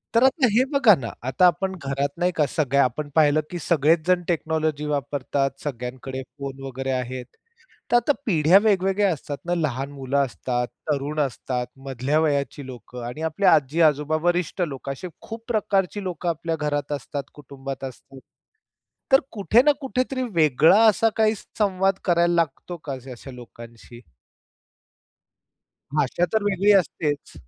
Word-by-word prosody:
तर 230 - +5
आता 265 0 +4
हे 235 +5 +4
बघा 270 -7 +6
ना, 115 - -5 0.2
आता 155 +8 +3
आपण 190 +2 0
घरात 140 +2 -2
नाही 180 +1 +2
का 150 - +3
सगळ्या 140 -2 +2
आपण 145 +4 -2
पाहिलं 155 -1 +4
की 175 - -5
सगळेच 160 0 +3
जण 180 -1 +3
टेक्नॉलॉजी 155 -3 -1
वापरतात, 140 -1 -1
सगळ्यांकडे 130 0 -5 0.2
फोन 135 -1 -6
वगैरे 135 0 -4
आहेत. 125 0 -3 0.7
तर 240 - +5
आता 290 +4 +3
पिढ्या 170 -2 +5
वेगवेगळ्या 195 -1 +2
असतात 145 -2 -5
ना, 175 - 0
लहान 140 -5 -2
मुलं 135 0 -3
असतात, 125 -1 -3 0.2
तरुण 145 +1 -1
असतात, 125 -2 -2 0.2
मधल्या 135 +3 0
वयाची 140 -3 -1
लोकं 125 -1 -9
आणि 125 +7 -6
आपल्या 195 +5 +3
आजी-आजोबा, 150 +1 +2
वरिष्ठ 175 +1 0
लोक 135 -1 -7
असे 140 +7 -5
खूप 225 0 -9
प्रकारची 205 -3 0
लोक 180 -2 -5
आपल्या 165 -1 -1
घरात 150 -1 -2
असतात, 145 -1 -4
कुटुंबात 135 -1 -8
असतात. 135 +1 -10 0.9
तर 270 - +8
कुठे 220 +3 +3
ना 295 +2 +5
कुठेतरी 255 -1 -2
वेगळा 160 - +5
असा 225 +1 +4
काही 220 0 +3
संवाद 195 -2 0
करायला 175 -1 +3
लागतो 170 +1 -1
का 145 - -4 0.2
अशा 130 +2 -9
लोकांशी? 120 -1 -13 2.0
भाषा 150 +4 +1
तर 220 - +2
वेगळी 200 0 +3
असतेच. 150 -5 0
150 Hz, 145 wpm, -23 LUFS, 135-185 Hz, 2.0 s, तर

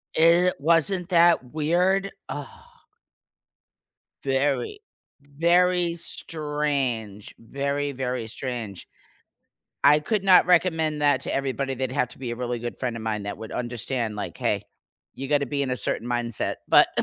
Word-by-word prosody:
It 170 +3 +5
wasn't 170 +4 +2
that 170 -7 +3
weird? 180 +5 +1 0.2
Ugh. 145 -1 -4 1.8
Very, 135 - 0 0.4
very 170 +4 +2
strange. 140 -11 -2
Very, 140 +4 -3
very 125 -3 -3
strange. 115 -6 -6 1.0
I 150 +1 +6
could 195 +5 -1
not 185 -2 +6
recommend 160 -4 +2
that 145 0 +3
to - - -3
everybody, 135 0 -2
they'd 130 0 -3
have 125 -3 0
to - - -15
be 125 -3 -5
a 120 - -4
really 120 -1 -3
good 120 +1 -6
friend 120 -3 -3
of 110 - -7
mine 105 -2 -3
that 100 - -5
would 110 - -8
understand, 120 -2 -3
like, 100 - -5
"Hey. - - -1 0.5
You 135 - -5
gotta 145 -1 +2
be 140 -1 -2
in 130 - -2
a 125 - -1
certain 115 +2 -1
mindset," 120 -2 -2
but - - +6
140 Hz, 145 wpm, -25 LUFS, 120-165 Hz, 1.8 s, I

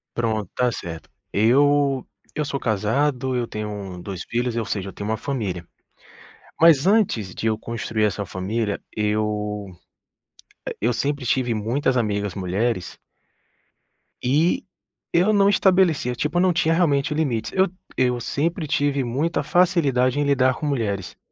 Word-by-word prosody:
Pronto, 110 -4 -1
está 125 -1 0
certo. 85 -6 -7 0.2
Eu 135 +4 +3 0.3
eu 150 - -1
sou 140 0 -3
casado, 125 +5 0
eu 120 - 0
tenho 105 -4 -6
2 95 -1 -6
filhos, 120 0 -2
eu 115 -1 -1
seja, 100 -2 -3
eu - - -11
tenho 100 +1 -5
uma 110 - 0
família. 100 -11 -3 1.0
Mas 165 -2 +6
antes 185 - +2
de 110 - -4
eu 110 -1 +1
construir 110 -1 -2
essa 100 -1 0
família, 100 +3 -2
eu 105 -1 -1 1.2
e 110 - 0
eu 120 - +3
sempre 140 +1 -2
tive 120 0 +1
muitas 125 +5 0
amigas 105 -4 -1
mulheres 95 +1 -2 1.3
e 150 +7 +2 0.5
eu 185 +5 +4
não 200 -1 +5
estabelecia, 185 -10 +3
tipo, 150 +7 -1
eu - - +4
não 185 -1 +3
tinha 165 -1 +2
realmente 150 -3 +2
limites, 135 -8 -1
eu 190 0 +3 0.3
eu 125 -1 +1
sempre 160 +7 -1
tive 140 -1 +1
muita 140 +8 -1
facilidade 145 -9 +2
em - - +2
lidar 130 -2 +3
com - - -5
mulheres. 110 -9 -2
125 Hz, 145 wpm, -23 LUFS, 105-145 Hz, 1.3 s, Mas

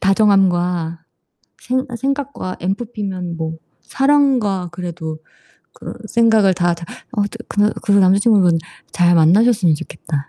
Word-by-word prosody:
다정함과 180 -5 +1 0.6
생 260 +1 -1
생각과 275 -6 -4
ENFP면 190 -3 -4
뭐 160 0 -4 0.3
사랑과 265 -10 +1
그래도 170 -3 -6 0.6
그 - - -9
생각을 220 -4 +3
다 175 -1 +1
다 170 0 -8 0.3
어 215 -5 0
드 205 +3 -6
그러 205 +1 +1
그런 200 -1 +3
남자친구분 190 -2 +3 0.3
잘 175 -1 +3
만나셨으면 180 +1 +4
좋겠다. 150 -1 -6
195 Hz, 270 characters per minute, -18 LUFS, 175-225 Hz, 0.6 s, 만나셨으면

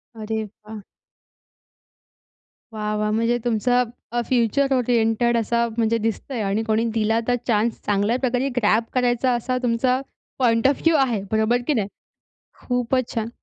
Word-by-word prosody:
अरे 220 0 -3
वाह! 215 +1 -11 1.9
वाह! 210 -1 -3
वाह! 210 0 0
म्हणजे 230 +2 +1
तुमचं 245 +2 +2 0.3
अ, 240 0 0
फ्युचर 260 +3 +1
ओरिएंटेड 235 -1 +2
असं 235 +1 +1
म्हणजे 230 0 +2
दिसतंय 225 +3 -3
आणि 200 +3 0
कोणी 220 0 +1
दिला 225 0 +1
तर 245 - +3
चान्स 225 0 +1
चांगल्या 205 +4 +1
प्रकारे 255 +1 0
ग्रॅब 220 0 +3
करायचा 250 0 +1
असा 255 +2 -2
तुमचा 250 +2 +1 0.4
पॉइंट 230 -1 +3
ऑफ 275 - 0
व्ह्यू 330 0 +3
आहे, 245 -7 +1
बरोबर 220 +3 +2
की 300 - +3
नाही? 210 -6 0 0.7
खूपच 250 0 -1
छान! 225 -1 -2
230 Hz, 145 wpm, -22 LUFS, 220-250 Hz, 1.9 s, तर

